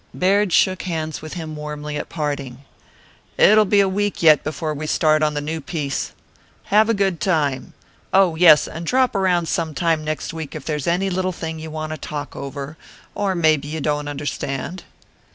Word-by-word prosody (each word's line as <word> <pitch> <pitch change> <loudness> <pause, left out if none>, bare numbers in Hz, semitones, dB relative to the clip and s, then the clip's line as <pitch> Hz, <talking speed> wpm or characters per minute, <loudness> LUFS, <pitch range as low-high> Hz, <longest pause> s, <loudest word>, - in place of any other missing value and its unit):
Baird 195 +1 +2
shook 185 +2 +3
hands 160 -3 -4
with 155 0 -8
him 160 -3 -6
warmly 150 0 -6
at - - -5
parting. 140 -4 -4 0.7
"It'll 215 +1 +6
be 200 +1 +4
a 195 - +3
week 205 0 -1
yet 155 -3 +6
before 155 +1 -3
we 155 +1 -5
start 155 0 +3
on 150 -1 +1
the 145 - -1
new 160 +2 -4
piece. 140 -3 -3 0.6
Have 215 +2 +5
a 230 - +3
good 195 -4 0
time. 145 -8 0 0.4
Oh, 190 -2 +4
yes, 160 -3 +6
and 165 - -7
drop 255 +7 +2
around 180 -3 +2
some 160 -1 -2
time 165 -2 +1
next 155 +1 -4
week 160 -3 -6
if 155 - -7
there's 150 -2 -3
any 185 +3 +1
little 185 +1 0
thing 160 -2 -6
you 160 0 -7
want 155 0 -5
to 155 - -5
talk 145 -1 -6
over 140 +2 -6 0.4
or 200 -2 -1
maybe 155 -4 +2
you 160 +2 -4
don't 150 0 -1
understand." 145 +3 -4
155 Hz, 190 wpm, -21 LUFS, 150-185 Hz, 0.7 s, It'll